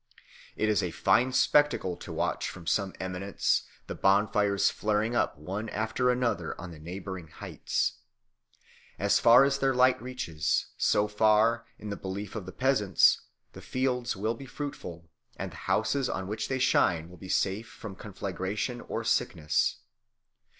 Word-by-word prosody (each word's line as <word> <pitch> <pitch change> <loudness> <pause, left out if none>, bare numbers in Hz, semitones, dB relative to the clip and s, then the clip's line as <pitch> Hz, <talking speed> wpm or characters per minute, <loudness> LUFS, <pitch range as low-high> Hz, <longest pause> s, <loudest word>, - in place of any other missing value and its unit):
It 110 - 0
is 105 -2 +2
a - - -1
fine 125 +2 +2
spectacle 130 -7 +3
to - - -9
watch - - -1
from 85 -2 -10
some 95 +3 0
eminence 95 +1 -1 0.2
the - - -5
bonfires 100 0 +2
flaring 110 +2 0
up 120 - +1
one 95 +9 -5
after 110 +4 0
another 115 -9 -1
on 85 0 -7
the 80 - -11
neighbouring 90 +1 -7
heights. - - -2 1.0
As - - +3
far 120 +3 +7
as 140 0 +1
their 135 -1 +2
light 125 -2 +4
reaches, 120 -12 -2
so 105 - +2
far, 110 +2 +3
in 105 - -7
the - - -2
belief 100 +2 -6
of 100 -5 -5
the - - -6
peasants, 115 -8 +3 0.3
the - - -10
fields 130 -2 -1
will 110 +4 -1
be 135 +3 -10
fruitful, 100 - -7 0.3
and - - -5
the - - -12
houses 125 +5 +1
on 95 - -3
which 105 +2 -3
they 130 - -1
shine 85 -9 +2
will 90 +1 -14
be 95 - -10
safe 100 +5 0
from 100 -4 -9
conflagration 100 +4 -4
or - - -4
sickness. 75 -1 0
105 Hz, 155 wpm, -29 LUFS, 95-120 Hz, 1.0 s, far